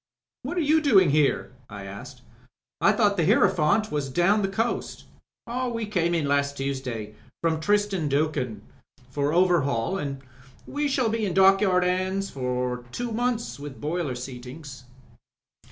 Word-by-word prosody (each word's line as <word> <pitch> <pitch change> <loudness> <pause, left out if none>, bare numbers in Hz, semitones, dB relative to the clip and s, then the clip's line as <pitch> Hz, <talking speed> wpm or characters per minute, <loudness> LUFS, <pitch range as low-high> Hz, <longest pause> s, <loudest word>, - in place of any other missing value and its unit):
"What 355 - -5
are - - +2
you 315 +1 +3
doing 195 - +5
here?" 145 -3 +1 0.2
I 100 -2 -8
asked. 125 +6 -10 0.6
"I 200 - +5
thought 210 -2 +2
the 165 - +2
Hierophant 200 0 +3
was 145 -2 -2
down 175 +9 +3
the 195 - +1
coast?" 225 +5 -3 0.7
"We 230 -1 -3
came 175 -5 0
in 155 -4 0
last 140 0 0
Tuesday 130 -6 -4 0.2
— - - -45
^from 160 -1 +1
Tristan 205 -4 +1
D*Acunha 140 -7 -1 0.3
— 125 0 -28
^for 145 +1 0
overhaul, 175 -3 +2
and 140 -3 -5 0.4
we 290 0 -2
shall 265 -4 +1
be 225 0 -1
in 190 -4 -1
dockyard 190 -1 +5
'ands 185 +2 -1
for 125 -1 -2
two 240 - -4
months, 235 - -2
with 145 -2 -8
boiler 150 -3 -2
seatings." 125 +1 -9
165 Hz, 155 wpm, -25 LUFS, 135-205 Hz, 0.7 s, doing